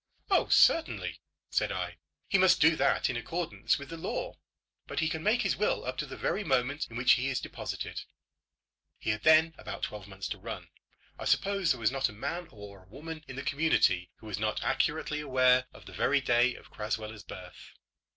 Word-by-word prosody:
"Oh, - - +4
certainly," 90 - +3 0.3
said - - +1
I; 90 -1 -4 0.3
"he 195 - +3
must 185 0 +5
do 160 +1 +6
that - - +2
in 125 - -2
accordance 120 - -1
with 140 - -9
the 165 - -6
law. - - -4 0.5
But - - -3
he 160 - +2
can 160 0 -3
make 225 +6 +2
his 195 - +1
will 210 - 0
up 130 +1 -3
to 150 - -2
the 135 - -8
very 210 - -1
moment 135 0 0
in 115 - -7
which 125 +1 +4
he 135 -1 +3
is 135 - 0
deposited." - - -5 1.0
He 110 - -1
had 105 0 -3
then 160 +3 +5
about 105 -2 -7
twelve 105 -2 -5
months 95 -1 -6
to - - -5
run. - - -7 0.5
I - - -5
suppose 195 -3 +2
there - - +2
was 110 0 +2
not 135 0 0
a - - -10
man 165 +11 -4
or 100 -4 -12
woman 155 +7 -8
in 135 - -8
the 135 - -5
community 135 - +2
who - - -17
was 105 -2 -4
not 110 0 -1
accurately 150 +2 0
aware 130 -3 +3
of - - -15
the - - -11
very 145 +1 +2
day 120 -1 +3
of - - -15
Crasweller's 105 0 -4
birth. 90 -1 -11
130 Hz, 200 wpm, -30 LUFS, 110-160 Hz, 1.0 s, do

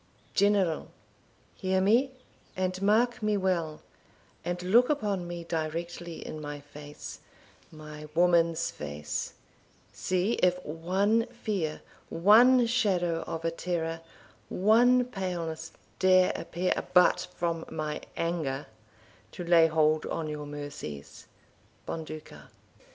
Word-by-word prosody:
General, 200 -5 +2 0.7
Hear 190 0 +1
me, 230 +8 +4 0.5
and 185 0 -1
mark 235 +4 +2
me 210 -1 +1
well, 170 -5 -1 0.6
and 175 +1 -2
look 235 +7 +5
upon 205 -11 -1
me 175 0 -6
Directly 170 +1 -4
in 155 - -6
my 145 -1 -6
face 145 +1 -10 0.5
my 150 -1 -10
woman's 170 -1 +3
face 75 0 -5 0.6
See 185 +5 0
if 180 0 +4
one 190 +9 +1
fear, 210 -10 -3 0.3
one 235 +8 +6
shadow 190 -8 +1
of 165 0 -4
a 165 - +1
terror, 165 -1 -3 0.5
One 245 +6 +4
paleness 180 -8 -4 0.3
dare 185 -1 +5
appear, 180 +2 -1 0.2
but 180 - +5
from 165 -1 -1
my 155 -1 -4 0.2
anger, 155 -5 -2 0.7
To 175 - -6
lay 170 -1 +6
hold 155 -1 +2
on 165 -2 -3
your 150 -1 -5
mercies. 145 - -8 0.6
Bonduca. 155 - -7
175 Hz, 110 wpm, -29 LUFS, 155-195 Hz, 0.7 s, one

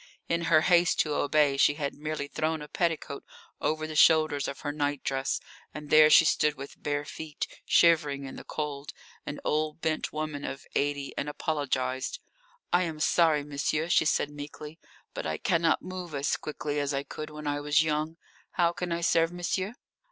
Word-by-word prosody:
In 170 0 0
her 155 -1 +5
haste 175 0 +3
to 150 - -1
obey 145 -1 +2
she 145 +1 +4
had 145 -2 -3
merely 150 -1 -4
thrown 155 +1 -2
a - - -9
petticoat 160 -4 -2 0.4
over 155 0 0
the 155 0 -6
shoulders 155 -2 +4
of 140 - -6
her 145 - -2
nightdress, 145 -2 -1 0.4
and 150 -1 -8
there 155 0 +8
she 165 - +7
stood 150 -1 +2
with 140 0 -10
bare 145 0 -2
feet, 155 0 -5 0.2
shivering 150 -5 +4
in 135 - -7
the - - -9
cold, 145 -2 -5 0.3
an 145 - -4
old 155 +1 0
bent 160 -1 -1
woman 155 -2 -4
of 135 - -6
eighty, 145 -1 -1
and 150 - -2
apologised. 130 -4 -2 0.5
"I 175 - +5
am 160 -4 -3
sorry, 155 -2 +3
monsieur," 150 +3 -1
she 165 - +4
said 150 -1 +1
meekly. 150 +2 -9 0.3
"But - - -4
I 80 0 -2
cannot 165 - +1
move 180 -4 -6
as 140 +2 0
quickly 150 -1 -4
as 145 0 -1
I 135 - -1
could 155 +1 -7
when 150 0 -9
I 145 0 -1
was 145 +2 +3
young. 155 +1 -1 0.4
How 170 -2 +3
can 175 0 -4
I 170 0 -1
serve 165 0 +3
monsieur?" 185 +4 -2
150 Hz, 180 wpm, -28 LUFS, 145-160 Hz, 0.5 s, there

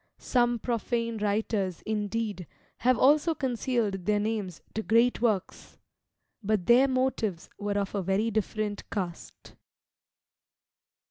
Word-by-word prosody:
Some 240 -1 +1
profane 230 0 -2
writers, 205 -3 -1
indeed, 210 -3 -2 0.3
have 250 0 +3
also 300 +4 +4
concealed 235 - -1
their 210 -1 +3
names 205 -5 -2
to 220 - -2
great 230 +2 +3
works, 215 -6 -1 0.6
but 210 -3 0
their 250 +6 +6
motives 255 -9 -1
were 205 0 -1
of 200 -1 -2
a 200 - -1
very 195 +5 0
different 215 -1 -2
cast. 180 -5 -6
220 Hz, 115 wpm, -28 LUFS, 200-240 Hz, 0.6 s, their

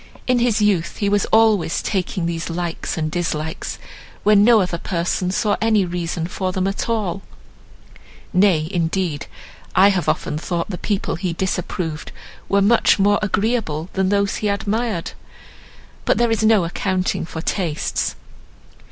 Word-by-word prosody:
In 250 -1 +2
his 230 -3 +2
youth 185 -5 +1
he 200 - 0
was 205 -1 +2
always 220 -6 +3
taking 185 -3 -1
these 165 0 -3
likes 170 0 -3
and 155 -1 -1
dislikes, 160 -2 -3 0.5
when 205 -1 +5
no 230 0 +6
other 180 -3 -1
person 180 +1 -1
saw 205 +2 +1
any 220 -3 +3
reason 170 -1 -3
for 185 +1 -3
them 185 0 -1
at 195 +4 -2
all; 200 -5 -1 1.1
nay, 180 -5 +3
indeed, 170 -3 -1 0.5
I 195 +2 +7
have 190 -3 0
often 150 - -1
thought 175 +3 -3
the 180 - -5
people 200 -6 -2
he 180 -1 -2
disapproved 170 -3 -3 0.4
were 200 0 +3
much 230 +3 +4
more 205 +1 +3
agreeable 200 -6 -1
than 190 -1 +1
those 200 -1 +1
he 210 - -1
admired;—but 210 -1 -4
there 235 -1 +2
is 225 - +1
no 215 -3 +5
accounting 185 +2 -1
for 160 -1 -6
tastes. 170 -7 -1
190 Hz, 145 wpm, -20 LUFS, 170-205 Hz, 1.1 s, I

